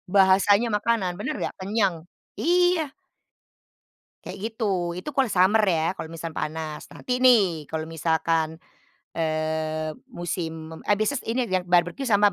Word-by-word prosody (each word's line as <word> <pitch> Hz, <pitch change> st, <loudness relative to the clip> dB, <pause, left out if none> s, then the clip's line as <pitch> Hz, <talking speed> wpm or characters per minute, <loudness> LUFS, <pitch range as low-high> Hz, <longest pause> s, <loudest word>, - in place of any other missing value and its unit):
Bahasanya 200 Hz, +3 st, +5 dB
makanan, 210 Hz, -4 st, 0 dB
bener 300 Hz, +9 st, -3 dB
nggak? -, -, -3 dB
Kenyang, 190 Hz, -4 st, -1 dB, 0.3 s
iya! 355 Hz, -3 st, +2 dB, 1.3 s
Kayak -, -, -7 dB
gitu, 190 Hz, -7 st, -2 dB
itu 180 Hz, -, -5 dB
kalau 265 Hz, -2 st, +2 dB
summer 195 Hz, +3 st, +4 dB
ya 170 Hz, -3 st, +2 dB
kalau 160 Hz, -, -7 dB
misal 165 Hz, 0 st, -6 dB
panas. 155 Hz, 0 st, -5 dB
Nanti 250 Hz, 0 st, -3 dB
nih, 190 Hz, -, +4 dB
kalau 160 Hz, 0 st, -3 dB
misalkan, 160 Hz, 0 st, 0 dB, 0.6 s
eee, 155 Hz, -1 st, -1 dB, 0.2 s
musim 165 Hz, -2 st, -5 dB
mem 160 Hz, -, -9 dB
eee, 205 Hz, -, +4 dB
bises 230 Hz, +6 st, 0 dB
ini 245 Hz, +2 st, +1 dB
yang 225 Hz, -, -7 dB
yang -, -, -12 dB
barbeque 175 Hz, +9 st, +2 dB
sama, 205 Hz, -1 st, +4 dB
180 Hz, 140 wpm, -25 LUFS, 160-220 Hz, 1.3 s, Bahasanya